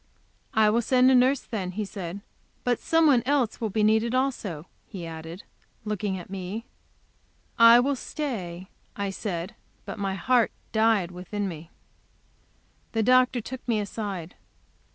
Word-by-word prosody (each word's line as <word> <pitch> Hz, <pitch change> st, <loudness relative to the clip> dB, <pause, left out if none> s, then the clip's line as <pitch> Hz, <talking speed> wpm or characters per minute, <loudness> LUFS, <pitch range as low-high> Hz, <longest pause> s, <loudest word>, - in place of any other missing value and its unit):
"I 215 Hz, -1 st, +5 dB
will 235 Hz, +2 st, +2 dB
send 255 Hz, +2 st, +4 dB
a -, -, +5 dB
nurse, 255 Hz, +2 st, +4 dB
then," 190 Hz, -5 st, -4 dB
he 210 Hz, +2 st, -2 dB
said. 195 Hz, -1 st, -6 dB, 0.4 s
"But 245 Hz, -1 st, +1 dB
some 325 Hz, 0 st, +3 dB
one 270 Hz, -6 st, +5 dB
else 270 Hz, -6 st, +1 dB
will 220 Hz, -, 0 dB
be 215 Hz, +2 st, 0 dB
needed 220 Hz, +3 st, +3 dB
also," 230 Hz, -, -1 dB, 0.2 s
he 180 Hz, -4 st, -7 dB
added, 165 Hz, +2 st, -8 dB, 0.4 s
looking 210 Hz, -2 st, -2 dB
at 180 Hz, -, -9 dB
me. 195 Hz, +4 st, -5 dB, 0.9 s
"I 230 Hz, +1 st, +9 dB
will 275 Hz, +3 st, +1 dB
stay," 190 Hz, -, -5 dB, 0.3 s
I 200 Hz, -1 st, -2 dB
said. 190 Hz, -1 st, -4 dB, 0.3 s
But -, -, -7 dB
my 195 Hz, -1 st, -1 dB
heart 245 Hz, +3 st, +2 dB, 0.2 s
died 220 Hz, -5 st, +2 dB
within 185 Hz, +3 st, -4 dB
me. 165 Hz, -2 st, -8 dB, 1.2 s
The 225 Hz, -1 st, +1 dB
doctor 255 Hz, +1 st, +4 dB
took 260 Hz, +3 st, -7 dB
me 225 Hz, -3 st, +1 dB
aside. 200 Hz, -4 st, -5 dB
215 Hz, 150 wpm, -26 LUFS, 185-245 Hz, 1.2 s, I